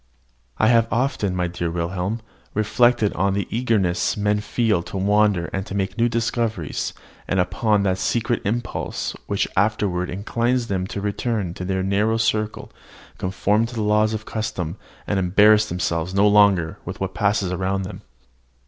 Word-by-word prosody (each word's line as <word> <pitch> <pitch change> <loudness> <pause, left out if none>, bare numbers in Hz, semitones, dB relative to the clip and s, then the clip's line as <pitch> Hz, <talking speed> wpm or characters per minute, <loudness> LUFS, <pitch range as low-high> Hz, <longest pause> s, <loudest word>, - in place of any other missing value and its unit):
I - - +3
have 115 -1 +4
often, 115 -6 0
my 90 -1 0
dear 85 -1 -3
Wilhelm, 90 +6 -2 0.3
reflected 110 0 +3
on 95 +2 +1
the 100 -3 -1
eagerness 110 -8 +1
men 105 0 +1
feel 105 -3 +1
to 90 - -7
wander 100 -2 +2
and 95 +1 -4
make 95 0 -1
new 120 +1 +2
discoveries, 115 - -2 0.3
and 95 - 0
upon 100 +4 +1
that 95 -1 0
secret 115 +4 0
impulse 115 +4 -3
which 100 - 0
afterward 95 -3 +1
inclines 120 +5 0
them 95 -1 -1
to 100 - -5
return 105 -2 -2
to 90 - -6
their 95 0 -1
narrow 105 +4 +1
circle, 110 -1 -1 0.5
conform 105 +4 +1
to 120 - -9
the 110 - -1
laws 105 +1 +2
of 110 0 -6
custom, 90 -6 -3 0.3
and 100 - 0
embarrass 105 +4 +5
themselves 85 0 -2
no 100 +1 +5
longer 100 -5 +4
with - - -7
what 95 -1 -3
passes 100 -2 +1
around 95 +1 -1
them. 95 - -7
100 Hz, 155 wpm, -22 LUFS, 95-110 Hz, 0.5 s, embarrass